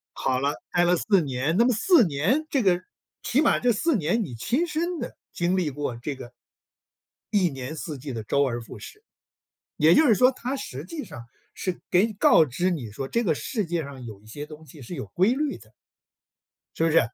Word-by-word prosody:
好 130 -1 0
了， 140 +2 0 0.2
呆 175 - +3
了 175 +1 +4
4 195 +1 +2
年。 140 +2 -1
那 235 - +5
么 250 - +4
4 265 - +5
年 175 - +1
这 275 -4 +1
个 180 -2 +3 0.4
起 270 - +2
码 305 - +3
这 245 - +3
4 310 +8 +1
年 200 +4 +1
你 135 - -7
亲 240 - 0
身 335 +2 -2
的 - - -6 0.2
经 175 +2 0
历 175 -5 +1
过 145 -3 -4
这 135 +4 -4
个 120 -1 -10 1.0
一 185 -4 +3
年 135 +2 -6
四 155 -1 -5
季 135 +1 -7
的 110 -2 -5
周 140 +6 +2
而 120 -3 -1
复 - - -11
始。 425 +1 -12 0.7
也 160 +2 +5
就 315 - +5
是 225 - +6
说 255 +5 +5
它 255 +2 -4
实 140 - -6
际 295 - -6
上 140 -7 -10 0.3
是 185 -2 -4
给 185 +5 +4
你 220 - -6
告 180 -4 +6
知 165 +7 -1
你 135 - -4
说 135 +6 -5
这 235 - 0
个 170 -8 +1
世 215 - -3
界 170 0 -1
上 140 -3 -9
有 110 -4 -9
一 - - -20
些 145 +7 -7
东 155 +1 -12
西 145 0 -13
是 125 - -7
有 - - -5
规 190 +6 +2
律 290 +1 -1
的。 - - -19 1.0
是 - - 0
不 165 - +3
是？ 165 - +6
170 Hz, 230 characters per minute, -25 LUFS, 140-230 Hz, 1.0 s, 是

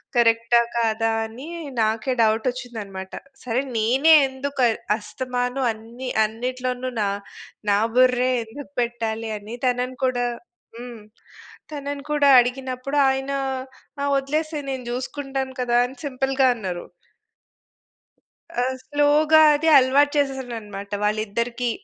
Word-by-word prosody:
కరెక్టా 230 0 +4 0.2
కాదా? 225 -1 +1
అని 235 +7 -9 0.3
నాకే 220 +4 0
డౌటచ్చిందన్నమాట. 220 -4 -2 0.3
సరే, 250 +1 0 0.2
నేనే 260 +9 +4 0.2
ఎందుకు 265 0 -3 0.3
అస్తమాను 250 +3 -3
అన్ని 230 +4 -8 0.2
అన్నిట్లోనూ 250 +3 -3
న 210 - +2 0.7
నా 200 - +4 0.2
బుర్రే 255 0 +4
ఎందుకు 280 +6 -11
పెట్టాలని 225 -2 -3
తనను 250 +1 0
కూడా 245 -1 0 0.5
హ్మ్. 240 -2 -9 0.7
తనను 285 -1 -5
కూడా 290 -1 +4
అడిగినప్పుడు, 255 +2 -2
ఆయన 270 +1 -2 0.7
"ఆ - - +1
వదిలేసేయి, 300 +1 -2
నేను 260 -2 -5
చూసుకుంటాను 265 +1 -4
కదా!" 240 -1 +2
అని 255 +2 -8
సింపుల్‌గా 270 0 +1
అన్నరు. 185 -6 -5 1.7
ఆ! 245 - 0 0.2
స్లోగా 295 +2 +4
అది 300 +2 0
అలవాటు 275 +2 +4
చేసేసానన్నమాట 235 -8 -3
వాళ్ళిద్దరికీ. 230 +3 -1
250 Hz, 100 wpm, -23 LUFS, 225-270 Hz, 1.7 s, కరెక్టా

